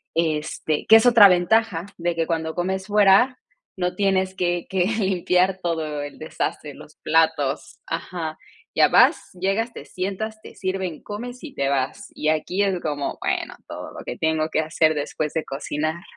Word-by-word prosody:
este, 155 -2 -1
que 220 - +9
es 225 - +2
otra 230 -4 +9
ventaja, 180 0 +2
de 175 0 -1
que 165 0 0
cuando 160 -1 -2
comes 190 +2 -2
fuera 210 +5 +5 0.4
no 180 -1 -1
tienes 190 -1 +1
que 175 -2 -1
que 190 -2 +1
limpiar 190 -3 +1
todo 160 -4 -2
el 145 0 -7
desastre, 155 -1 -4
los 150 +2 -14
platos 160 -3 0
ajá. 165 -1 -4 0.4
Ya - - +6
vas, - - +4
llegas, 200 +6 0
te - - -9
sientas, 210 +4 -4
te - - -12
sirven, 185 -4 -3
comes, 245 +5 -7
y 290 - -9
te 135 0 0
vas. 135 -1 -2
Y 155 - -3
aquí 155 +5 0
es 195 -2 +1
como, 145 -2 -3
bueno, - - -2
todo - - -7
lo - - -7
que - - -5
tengo 160 0 0
que 155 - 0
hacer 160 0 +2
después 150 +1 -3
de 160 - -2
cocinar. 155 +4 -3
175 Hz, 170 wpm, -23 LUFS, 155-195 Hz, 0.4 s, que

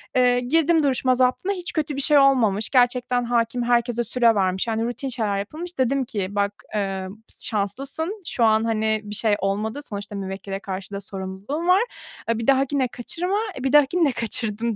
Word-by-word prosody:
Eee, 250 -1 +4
girdim 320 +5 +2
duruşma 255 -2 +2
zaptına, 255 +10 +1
hiç 360 -3 -6
kötü 300 -3 -1
bir 275 - -2
şey 295 +1 +5
olmamış. 225 -7 +3
Gerçekten 245 -1 +2
hâkim 235 0 0
herkese 240 0 +1
süre 235 -2 +3
vermiş, 190 +2 0
yani 225 0 0
rutin 260 +3 -4
şeyler 215 -5 -1
yapılmış. 320 - -6
Dedim 260 +1 +1
ki 200 -5 -3
bak, 200 0 0 0.2
emm, 195 -2 -3 0.3
şanslısın, 275 - -3
şu 235 - 0
an 220 0 +4
hani 220 -1 0
bir 210 0 -6
şey 215 -1 +2
olmadı. 210 +6 -2
Sonuçta 205 -4 -7
müvekkile 195 0 -5
karşı 195 -1 -6
da 200 - -4
sorumluluğun 200 - -5
var. 380 +5 +5 0.5
Eee, 230 - +2
bir 230 - -4
dahakine 270 -1 +2
kaçırma. 350 - -2 0.2
E, - - -7
bir 270 +1 0
dahakini 295 +4 +5
de - - +1
kaçırdım, 225 -1 -2
235 Hz, 180 wpm, -23 LUFS, 205-275 Hz, 0.5 s, şey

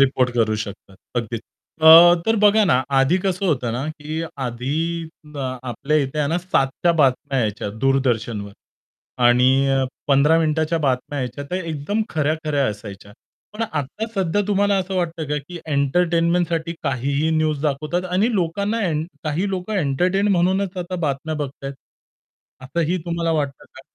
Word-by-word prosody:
Report 130 -2 +3
करू 110 -2 +2
शकतात. 100 -2 -8 0.2
अगदीच. 115 -1 -2 0.4
अ, - - +5 0.4
तर 225 - +3
बघा 210 +1 +5
ना 165 - +3 0.2
आधी 135 +7 +3
कसं 190 0 -1
होतं 125 -8 0
ना 130 - -3 0.2
कीआधी 140 -4 -4 0.9
आपल्या 135 +5 -1
इथे 135 +3 -4
आहे 145 -1 +1
ना 165 - +1
7 180 -7 +2 0.2
च्या 170 -1 +4
बातम्या 135 0 +2
यायच्या 105 -2 -2
दूरदर्शनवर 120 -6 0 0.7
आणि 125 +1 +5 0.6
15 145 +4 +4
मिनिटाच्या 160 +1 +1
बातम्या 135 +2 -1
यायच्या, 125 +2 -4
तर - - -2
एकदम 170 +5 -2
खऱ्या-खऱ्या 150 -2 0
असायच्या. 100 -1 -7 0.4
पण 220 +2 -4
आता 155 +3 -3
सध्या 190 0 +1
तुम्हाला 200 0 +2
असं 190 0 -3
वाटतं 170 -2 -2
का? 150 - 0
की 170 +5 -9
एंटरटेनमेंटसाठी 170 +3 +1
काहीही 140 +4 0
न्यूज 155 -2 0
दाखवतात 155 +5 -1
आणि 215 +6 +2
लोकांना 200 +5 -1
एं 155 0 -1 0.2
काही 165 +7 -1
लोकं 190 +3 -3
एंटरटेन 180 +5 +1
म्हणूनच, 185 +2 +1
आता 180 +1 -4
बातम्या 140 +3 -2
बघतायत. 135 0 -7 0.9
असंही 170 +6 -1
तुम्हाला 170 -1 -1
वाटतं 145 -3 -2
का? 130 - -15
155 Hz, 145 wpm, -21 LUFS, 135-180 Hz, 0.9 s, अ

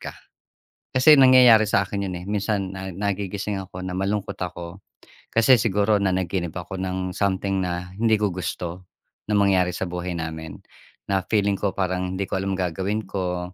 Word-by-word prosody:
ka. - - -7 0.8
Kasi 140 +4 +7
nangyayari 125 -4 +7
sa 100 - +3
akin 100 0 -3
yun, - - -5
eh. - - -10
Minsan 100 -2 -1
na 95 0 -6
nagigising 100 +1 -3
ako 95 -1 -9
na 90 - -4
malungkot 100 0 -2
ako 85 0 -6 0.6
kasi 115 +3 +5
siguro 105 0 +2
nanaginip 95 -2 -1
ako 90 +2 -6
ng 95 0 -3
something 95 0 0
na 90 0 -4
hindi 110 -1 +3
ko 105 -1 +1
gusto 90 0 -5 0.4
na - - +1
mangyari 95 -3 +3
sa 95 - -2
buhay 90 0 -4
namin, 80 -1 -6 0.5
na 95 -1 +2
feeling 100 -2 +2
ko, 100 -2 -1
parang 95 -1 -1
hindi 100 - -1
ko - - -1
alam 95 0 -2
gagawin 95 +4 -2
ko. 90 -2 -3
95 Hz, 170 wpm, -23 LUFS, 90-100 Hz, 0.8 s, Kasi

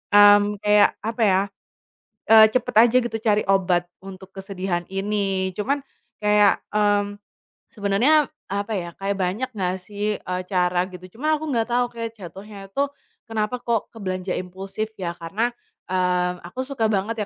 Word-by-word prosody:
mmm, 205 0 +7
kayak 210 0 +5
apa 225 +2 -3
ya, 190 -1 +4 0.8
eee, 220 0 +9
cepat 245 +2 -1
aja 250 - +3
gitu 240 - -4
cari 215 -2 +2
obat 185 -3 +2 0.2
untuk 190 0 -11
kesedihan 190 -2 -3
ini. 195 -1 -1
Cuman 230 +9 0 0.4
kayak, 210 -1 +4 0.2
mmm, 205 -1 +1 0.5
sebenarnya 245 +8 +3 0.2
apa 200 +3 -3
ya, 170 -2 -5
kayak 195 +2 -3
banyak 195 +7 -1
nggak 185 -1 0
sih, 205 +2 -3
eee, 180 0 -3
cara 180 -1 +1
gitu. 185 +2 -12
Cuma 305 +5 +1
aku 315 - -4
nggak 230 -5 +1
tau 245 +1 0
kayak 230 -1 -6
jatuhnya 195 0 -10
itu 280 +7 -1 0.3
kenapa 225 +1 -2
kok 235 -3 -2
ke - - -16
belanja 185 -2 -3
impulsif 195 +4 -5
ya? 170 -1 -3
Karena, 195 +9 -1 0.4
eee, 180 -1 +1
aku 180 +9 -5
suka 260 -3 -2
banget 215 +1 0
205 Hz, 155 wpm, -23 LUFS, 185-225 Hz, 0.8 s, eee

